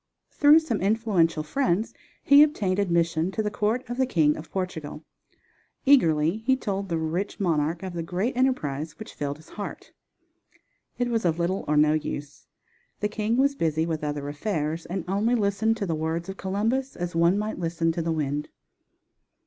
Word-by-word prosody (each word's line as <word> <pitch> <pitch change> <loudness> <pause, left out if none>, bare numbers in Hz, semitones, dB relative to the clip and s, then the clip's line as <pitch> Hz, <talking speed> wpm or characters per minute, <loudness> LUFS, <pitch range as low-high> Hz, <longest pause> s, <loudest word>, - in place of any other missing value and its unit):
Through 295 +1 +6
some 260 -10 -2
influential 195 -7 +2
friends 190 - 0 0.3
he 280 +1 +7
obtained 205 -11 +2
admission 170 -3 +1
to 220 - -1
the 210 - -1
court 220 +5 -1
of 245 +1 -5
the 260 -1 +2
King 155 - +3
of 155 0 -9
Portugal. 160 -5 -5 0.8
Eagerly 165 - +4
he 250 +4 +2
told 195 -5 -3
the 165 - 0
rich 165 +5 -3
monarch 165 -2 0
of 185 -2 -5
the 170 - -3
great 185 +9 -2
enterprise 160 - -1
which 220 - -9
filled 145 0 -4
his 155 - -18
heart. 205 - -7 1.1
It 245 -1 0
was 230 -2 0
of 170 -2 +1
little 175 +3 -1
or 150 0 +2
no 150 +1 +5
use, 145 -2 -5 0.5
the 210 - 0
king 215 +2 -1
was 280 +2 +3
busy 160 - 0
with 160 -2 -3
other 145 -1 -3
affairs, 155 0 -3
and 180 0 -4
only 210 +6 +1
listened 220 +1 +1
to 200 - -2
the 170 - -1
words 160 +3 -2
of 190 - -5
Columbus 225 +8 -1
as 175 0 -4
one 170 +3 +4
might 210 -1 -3
listen 165 -1 0
to 170 - -3
the 165 0 -1
wind. 150 -2 -2
180 Hz, 180 wpm, -26 LUFS, 160-220 Hz, 1.1 s, he